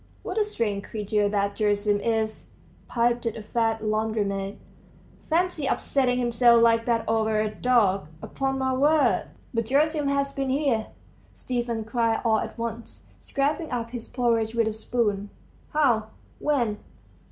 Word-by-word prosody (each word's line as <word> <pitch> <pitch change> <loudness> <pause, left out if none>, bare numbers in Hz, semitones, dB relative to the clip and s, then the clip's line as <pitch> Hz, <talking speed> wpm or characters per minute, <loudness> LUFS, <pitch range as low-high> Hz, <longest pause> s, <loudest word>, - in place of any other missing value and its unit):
"What - - -2
a - - +4
strange 220 - -2
creature 210 -1 0
that 200 -1 0
Gerasim 205 -1 +1
is!" 220 -1 -2 0.4
piped 240 0 +1
a 225 -1 -4
fat 225 0 0
laundrymaid; 215 -2 -1 0.7
"fancy, 330 -3 0
upsetting 255 -2 +1
himself 235 -1 +4
like 230 0 +4
that 230 -1 +1
over 220 -1 +1
a 215 0 -1
dog.... 210 -7 +2
Upon 270 +8 -2
my 260 0 0
word!" 275 -6 +3 0.3
"But 230 -1 -1
Gerasim 295 +3 +2
has 280 0 0
been 275 -1 -2
here," 260 -5 +1 0.5
Stepan 240 -3 -2
cried 230 0 0
all 220 -1 +3
at - - -6
once, 230 0 -6
scraping 295 +3 -1
up 230 -2 -3
his 240 -2 -6
porridge 230 -3 0
with 230 -1 +3
a - - 0
spoon. 215 -2 -1 0.4
"How? 245 -8 +2 0.3
when?" 240 -8 0
230 Hz, 140 wpm, -25 LUFS, 215-260 Hz, 0.7 s, a